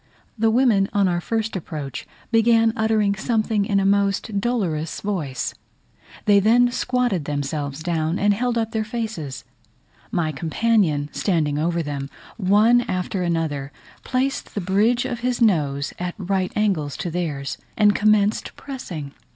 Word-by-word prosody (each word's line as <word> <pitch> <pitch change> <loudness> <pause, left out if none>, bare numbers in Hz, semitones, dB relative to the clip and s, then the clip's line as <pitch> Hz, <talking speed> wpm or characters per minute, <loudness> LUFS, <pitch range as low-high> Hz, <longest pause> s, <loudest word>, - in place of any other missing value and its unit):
The 225 -1 +2
women, 220 -5 +3
on 200 -2 +3
our 175 -1 0
first 220 +2 -2
approach, 150 -7 -5 0.2
began 225 0 +4
uttering 220 -2 +2
something 215 -1 0
in 200 0 +2
a 195 - +1
most 200 +1 +1
dolorous 180 -10 -1
voice; 160 -11 -3 0.7
they 205 -1 +6
then 240 +4 +4
squatted 245 - 0
themselves 145 0 -3
down 165 0 0
and 205 0 +3
held 240 +3 -1
up 225 -1 -1
their 220 -1 -1
faces; 215 - -5 0.7
my 160 -3 0
companion 160 -1 +1
standing 155 -6 0
over 170 +1 0
them, 140 -2 -4 0.3
one 215 +4 +4
after 185 +1 -2
another, 160 -5 -1 0.3
placed 265 +1 -2
the - - 0
bridge 215 +7 +2
of 245 -3 -3
his 250 0 -1
nose 145 - +1
at 180 0 -3
right 190 -1 -1
angles 185 -9 0
to 175 - -3
theirs, 150 -5 -3 0.2
and 210 -1 +5
commenced 210 0 +2
pressing. 175 - -7
200 Hz, 145 wpm, -22 LUFS, 160-225 Hz, 0.7 s, they